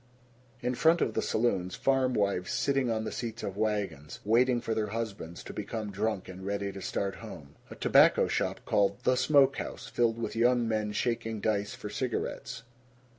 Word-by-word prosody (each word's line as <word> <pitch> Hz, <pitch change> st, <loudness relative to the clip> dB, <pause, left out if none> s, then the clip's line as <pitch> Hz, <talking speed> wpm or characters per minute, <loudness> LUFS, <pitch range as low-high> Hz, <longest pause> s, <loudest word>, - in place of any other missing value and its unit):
In 125 Hz, +1 st, 0 dB
front 165 Hz, +6 st, +4 dB
of 115 Hz, -, 0 dB
the -, -, 0 dB
saloons, 95 Hz, -6 st, 0 dB
farmwives 125 Hz, -9 st, +1 dB
sitting 135 Hz, -3 st, +1 dB
on 110 Hz, -1 st, 0 dB
the -, -, -4 dB
seats 115 Hz, -1 st, -5 dB
of 95 Hz, -, -4 dB
wagons, 105 Hz, -9 st, -2 dB
waiting 120 Hz, +3 st, +4 dB
for 115 Hz, -1 st, -2 dB
their 110 Hz, -1 st, -1 dB
husbands 100 Hz, -6 st, -5 dB
to -, -, -8 dB
become 110 Hz, -3 st, -4 dB
drunk 105 Hz, 0 st, -2 dB
and 95 Hz, 0 st, -9 dB
ready 100 Hz, 0 st, -2 dB
to 95 Hz, -, -8 dB
start 100 Hz, 0 st, -2 dB
home. 80 Hz, -11 st, -10 dB, 0.2 s
A -, -, -9 dB
tobacco -, -, +5 dB
shop -, -, -1 dB
called 100 Hz, -1 st, +2 dB
"The 130 Hz, -, +3 dB
Smoke 140 Hz, 0 st, +4 dB
House," -, -, -5 dB
filled 115 Hz, 0 st, +1 dB
with 115 Hz, -, -4 dB
young 120 Hz, 0 st, +3 dB
men 110 Hz, -1 st, -1 dB
shaking 115 Hz, 0 st, -1 dB
dice 100 Hz, -1 st, -1 dB
for 105 Hz, -, -7 dB
cigarettes. 125 Hz, -1 st, -3 dB
110 Hz, 175 wpm, -30 LUFS, 100-120 Hz, 0.2 s, tobacco